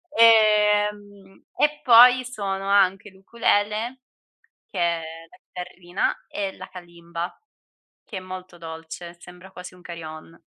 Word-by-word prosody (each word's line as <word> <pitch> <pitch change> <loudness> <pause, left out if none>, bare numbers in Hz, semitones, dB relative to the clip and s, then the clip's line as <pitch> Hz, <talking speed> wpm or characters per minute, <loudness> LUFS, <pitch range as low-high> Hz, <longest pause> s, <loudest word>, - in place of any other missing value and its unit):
ehm, 210 -3 +3
e 300 0 +1
poi 250 +1 +7
suono 195 -5 -4
anche 200 +1 +2
l'ukulele, 215 +4 -1 0.7
che 190 - -8
è 170 -1 0 0.3
la - - -18
chitarrina 180 0 -4
e 195 -2 -4
la - - -10
kalimba 170 -1 -8 0.7
che 215 - -9
è - - -8
molto 185 -1 -9
dolce, 165 +1 -9
sembra 180 +2 -14
quasi 180 0 -10
un 180 - -18
carillon. 165 -1 -10
190 Hz, 120 wpm, -23 LUFS, 175-210 Hz, 0.7 s, poi